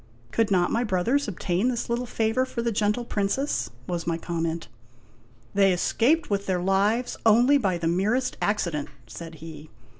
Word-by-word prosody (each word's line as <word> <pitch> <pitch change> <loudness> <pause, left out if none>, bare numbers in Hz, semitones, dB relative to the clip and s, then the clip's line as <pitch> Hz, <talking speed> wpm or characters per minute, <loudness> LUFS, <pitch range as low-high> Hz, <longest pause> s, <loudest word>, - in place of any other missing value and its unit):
" 120 0 -29
Could 225 -1 +1
not 180 -3 +2
my 235 - +1
brothers 230 +7 +1
obtain 190 +2 -1
this 245 -2 -1
little 240 +1 -2
favor 225 +2 +1
for 245 -2 -4
the 235 - 0
gentle 210 +3 0
Princess? 215 +8 -1
" 125 - -25
was 170 -2 -3
my 165 -1 0
comment. 165 -3 -3 0.4
" 115 +1 -31
They 195 -1 +4
escaped 250 - +2
with 200 -1 -2
their 185 -2 +1
lives 200 +6 +1
only 240 +6 +5
by 190 -7 0
the 170 -1 -2
merest 215 +9 +1
accident," 170 -8 -1 0.2
said 160 +8 -9
he. 155 -1 -10
200 Hz, 180 wpm, -25 LUFS, 170-235 Hz, 0.4 s, only